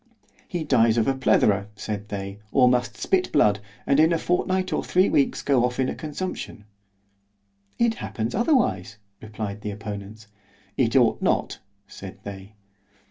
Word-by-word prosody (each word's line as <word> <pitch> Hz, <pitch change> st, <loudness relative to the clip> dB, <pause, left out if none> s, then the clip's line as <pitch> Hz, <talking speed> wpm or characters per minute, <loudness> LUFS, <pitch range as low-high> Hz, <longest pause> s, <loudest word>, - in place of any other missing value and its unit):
He 175 Hz, -3 st, -3 dB
dies 115 Hz, -6 st, +3 dB
of 115 Hz, -, +2 dB
a 135 Hz, -, +3 dB
plethora, 100 Hz, -6 st, +2 dB
said 105 Hz, -1 st, -5 dB
they—or 105 Hz, +5 st, 0 dB
must 125 Hz, -1 st, +1 dB
spit 185 Hz, -1 st, 0 dB
blood, 105 Hz, -8 st, +3 dB, 0.3 s
and 140 Hz, -, +3 dB
in 160 Hz, +2 st, +5 dB
a 165 Hz, -, +2 dB
fortnight 185 Hz, +2 st, 0 dB
or -, -, 0 dB
three 185 Hz, +2 st, +3 dB
weeks 140 Hz, -, +1 dB
go 135 Hz, -4 st, +3 dB
off 125 Hz, +1 st, -1 dB
in 130 Hz, -, +1 dB
a -, -, -2 dB
consumption.—— 155 Hz, -, -6 dB, 1.1 s
——It 235 Hz, -1 st, +2 dB
happens 115 Hz, -, -4 dB
otherwise—replied 105 Hz, -, -2 dB
the 105 Hz, -, -4 dB
opponents.—— 105 Hz, +1 st, -7 dB, 0.5 s
It 115 Hz, 0 st, +1 dB
ought 120 Hz, -4 st, +4 dB
not, -, -, 0 dB, 0.3 s
said -, -, -10 dB
they. 100 Hz, +1 st, -9 dB
115 Hz, 145 wpm, -24 LUFS, 105-150 Hz, 1.1 s, in